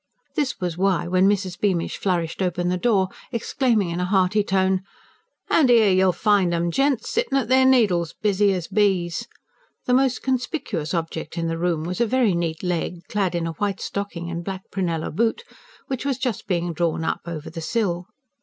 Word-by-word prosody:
This 275 -4 -1
was 175 -2 -3
why, 190 -2 +2
when 185 +2 +4
Mrs. 190 -3 -1
Beamish 185 -5 0
flourished 175 -3 -1
open 180 -1 0
the 180 - +1
door, 190 -2 +2 0.2
exclaiming 230 -5 0
in 170 - -3
a 180 - 0
hearty 190 +2 +2
tone: 190 -1 +1 0.7
"An' 285 -6 +4
'ere 225 -4 +6
you'll 185 0 +4
find 190 -1 +2
'em, 170 0 0
gents 270 +2 +1
sittin' 470 - +1
at 245 -4 -1
their 260 0 +5
needles, 185 -11 +3
busy 205 -1 +2
as 180 -3 -2
bees!" 190 -5 +1 0.6
the 250 - +1
most 260 0 +2
conspicuous 250 - -2
object 165 0 -4
in 165 - -1
the 165 0 -2
room 170 -3 0
was 180 +6 -3
a 235 - +3
very 245 -4 +2
neat 170 -1 -2
leg, 175 -1 -2
clad 195 -4 0
in 170 -1 -1
a 165 - -2
white 195 +4 -2
stocking 185 -4 -4
and 170 0 -4
black 190 0 -5
prunella 170 -5 -2
boot, 230 - +1 0.4
which 265 -2 -4
was 275 -3 -1
just 250 -5 -3
being 175 -2 -1
drawn 165 0 -1
up - - -1
over 160 -3 -6
the 165 0 -6
sill. 180 -2 -1
190 Hz, 190 wpm, -23 LUFS, 170-220 Hz, 0.7 s, ere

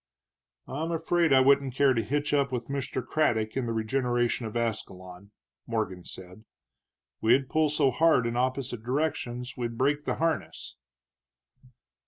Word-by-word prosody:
"I'm 160 +5 -3
afraid 165 0 +1
I 135 -1 +6
wouldn't 135 -1 +3
care 140 -1 +4
to 115 - +1
hitch 145 +7 -1
up 140 -2 +2
with 120 -1 -4
Mr. 135 -2 -3
Craddock 110 -7 0
in 130 -3 -1
the - - -2
regeneration 120 +1 0
of 110 - -4
Ascalon," 95 -4 -5 0.4
Morgan 105 -6 -3
said. 95 +3 -10 0.8
"We'd 125 +4 +3
pull 155 -1 +2
so 145 -2 +2
hard 155 -2 +3
in 115 0 -2
opposite 130 -2 -1
directions 125 -2 -2
we'd 120 -2 -4
break 145 +3 +1
the - - -1
harness." 165 0 -2
130 Hz, 145 wpm, -28 LUFS, 115-145 Hz, 0.8 s, I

